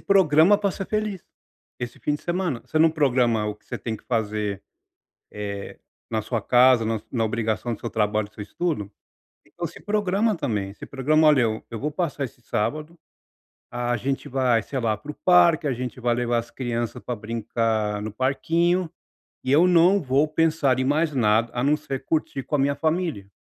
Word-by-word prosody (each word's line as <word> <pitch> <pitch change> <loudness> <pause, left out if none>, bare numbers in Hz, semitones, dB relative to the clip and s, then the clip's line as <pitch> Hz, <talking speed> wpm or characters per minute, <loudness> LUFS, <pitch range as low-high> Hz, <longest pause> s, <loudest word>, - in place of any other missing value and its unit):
programa 190 -1 +5
para 205 -1 0
ser 190 +1 -5
feliz. 215 -4 -2 0.6
Esse 120 -1 -5
fim 150 - 0
de 150 - -7
semana, 175 -7 -2
você 155 - -1
não 160 +1 +6
programa 125 -8 +2
o 105 - -3
que 105 - -30
você - - -5
tem 115 -2 -4
que - - -22
fazer, 105 -4 -2 0.7
eh, 100 -1 -6 0.3
na 110 - 0
sua 110 -1 -2
casa, 125 -2 +5
na 110 -1 -1
na 115 -3 +1
obrigação 115 +1 -1
do - - -14
seu 115 - -4
trabalho, 105 -1 0
do 105 - -30
seu 105 - -7
estudo? 125 - -3 0.6
Então 170 +11 -6
se 170 - -13
programa 205 +1 +1
também, 100 -9 -2
se - - -10
programa: 155 +4 +2
"Olha, 150 -4 +5
eu 110 -1 -1
eu 115 - -5
vou 150 +1 -2
passar 150 -4 -2
esse 120 0 -13
sábado 155 +10 -3 0.7
a 120 0 -1
gente 135 +5 -3
vai, 125 -4 +2
sei 135 - -5
lá, 110 -2 0
para 125 +8 -9
o - - -18
parque, 170 -3 +4
a 135 - +1
gente 125 +1 -5
vai 120 -1 +1
levar 120 0 0
as 120 0 -5
crianças 120 -3 -3
para 125 -2 -4
brincar 110 -1 -1
no 105 0 -5
parquinho 165 +8 +1 0.6
e 130 - 0
eu 165 +5 +6
não 180 +3 +5
vou 140 +2 +2
pensar 155 -5 +2
em - - +1
mais 150 +3 +1
nada, 115 -2 +2
a 120 - -1
não 145 +2 +3
ser 135 -3 -6
curtir 150 -3 -1
com 150 - -1
a - - -3
minha 140 +1 +2
família". 160 - -1
130 Hz, 195 wpm, -24 LUFS, 115-160 Hz, 0.7 s, não